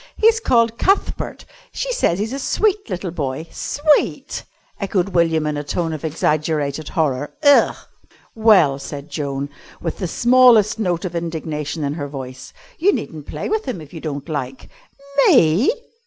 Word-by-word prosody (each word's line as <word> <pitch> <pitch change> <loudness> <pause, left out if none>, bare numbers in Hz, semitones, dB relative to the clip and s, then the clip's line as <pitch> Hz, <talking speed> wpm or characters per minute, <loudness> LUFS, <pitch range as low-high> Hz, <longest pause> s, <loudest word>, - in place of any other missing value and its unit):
"He's 450 +1 +4
called 230 - +2
Cuthbert. 390 +1 0 0.3
She - - -3
says 175 - +1
he's 215 +5 -3
a 275 - -3
sweet 410 - 0
little 180 -2 -3
boy." 145 -2 -3
"Sweet!" 295 +1 0 0.4
echoed 195 -2 0
William 165 -4 +2
in 150 -1 -1
a 145 - -3
tone 165 +2 -2
of 155 - -6
exaggerated 155 -1 -1
horror. 145 -4 -1
"Ugh!" 285 -1 +5 0.6
"Well," 195 -11 +4
said 145 +1 -8
Joan, 140 -1 -3 0.3
with 165 - -4
the 185 - -2
smallest 235 -1 +5
note 180 -4 -1
of 175 -1 -5
indignation 160 -2 -3
in 140 0 -1
her 145 -2 -4
voice, 130 -2 -8 0.3
"you 390 +5 +4
needn't 155 - -5
play - - -4
with 435 +1 -1
him 245 -9 -4
if 155 0 -12
you 165 - -7
don't 145 -2 -5
like." 135 -4 -5 0.5
"_Me? 170 - +5
165 Hz, 155 wpm, -20 LUFS, 150-225 Hz, 0.6 s, Ugh